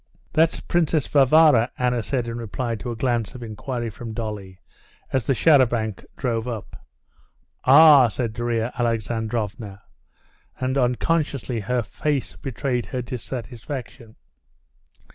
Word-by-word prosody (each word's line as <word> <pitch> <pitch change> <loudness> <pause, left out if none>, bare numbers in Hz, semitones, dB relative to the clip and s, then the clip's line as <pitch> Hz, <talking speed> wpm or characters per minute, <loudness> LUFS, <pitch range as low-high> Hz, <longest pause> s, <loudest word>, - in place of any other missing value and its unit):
"That's 160 +1 +2
Princess 160 -3 +1
Varvara," 140 -3 +5
Anna 125 -1 +1
said 125 +1 -2
in 115 0 -4
reply 115 +2 -3
to 120 +2 -5
a 120 - -3
glance 120 -3 -1
of 120 - -8
inquiry 115 +2 -4
from 110 +2 -8
Dolly 105 -5 -5 0.6
as 130 -3 0
the 135 - +2
char 150 +2 +5
à 130 -3 +4
banc 110 -4 -3
drove 115 -2 -2
up. 115 -4 -7 0.8
"Ah!" 145 -1 +8
said 115 0 -3
Darya 120 0 -1
Alexandrovna, 110 -3 -2 0.8
and 130 +1 -1
unconsciously 135 -1 0
her 125 +3 -1
face 145 +3 -2
betrayed 130 -2 -3
her 125 -2 -4
dissatisfaction. 120 0 -7
120 Hz, 125 wpm, -23 LUFS, 115-130 Hz, 0.8 s, Ah